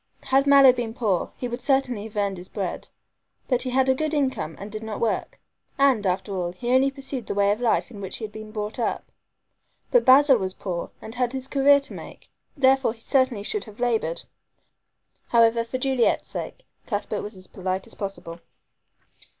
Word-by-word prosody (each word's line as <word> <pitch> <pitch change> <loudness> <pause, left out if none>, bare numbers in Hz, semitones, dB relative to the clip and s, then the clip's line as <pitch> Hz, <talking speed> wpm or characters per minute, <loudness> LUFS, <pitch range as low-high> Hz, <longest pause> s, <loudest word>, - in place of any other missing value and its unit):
Had 270 +1 +2
Mallow 275 -2 +8
been 235 -2 -4
poor 210 -8 0
he 250 - -3
would 240 +1 -5
certainly 250 -5 0
have 215 -1 -10
earned 200 -2 0
his 180 - -10
bread, 195 -4 -4 0.6
but 250 -2 +1
he 255 - -2
had 260 +1 +2
a 265 - +5
good 310 +3 -2
income 260 - -1
and 200 +1 -8
did 215 0 -5
not 220 -1 -5
work. 230 - -2 0.4
And, 265 -8 +3
after 190 +2 -1
all, 175 -1 -2
he 240 +7 -3
only 260 +2 +4
pursued 270 -4 -6
the - - -3
way 200 0 +3
of 210 +3 -2
life 240 +1 +1
in 205 -4 -9
which 190 - -5
he - - -8
had 210 - -9
been 215 0 -9
brought 215 +1 -4
up. 235 - -2 0.8
But - - +5
Basil 270 0 +7
was 185 -1 -3
poor 175 -3 -4
and 220 - -8
had 250 0 -1
his 265 0 -5
career 280 +1 +5
to 275 - -9
make, - - -11 0.3
therefore 265 -3 +3
he 230 - -19
certainly 260 -5 +1
should 420 - -3
have 215 -1 -14
labored. 225 -9 0 1.0
However, 230 0 +4
for 230 +3 -4
Juliet's 260 -2 +1
sake, - - -6 0.2
Cuthbert 205 -1 -2
was 205 -1 -8
as 185 - -8
polite 185 +1 -4
as - - -11
possible. 195 -4 -6
230 Hz, 200 wpm, -24 LUFS, 205-265 Hz, 1.0 s, Mallow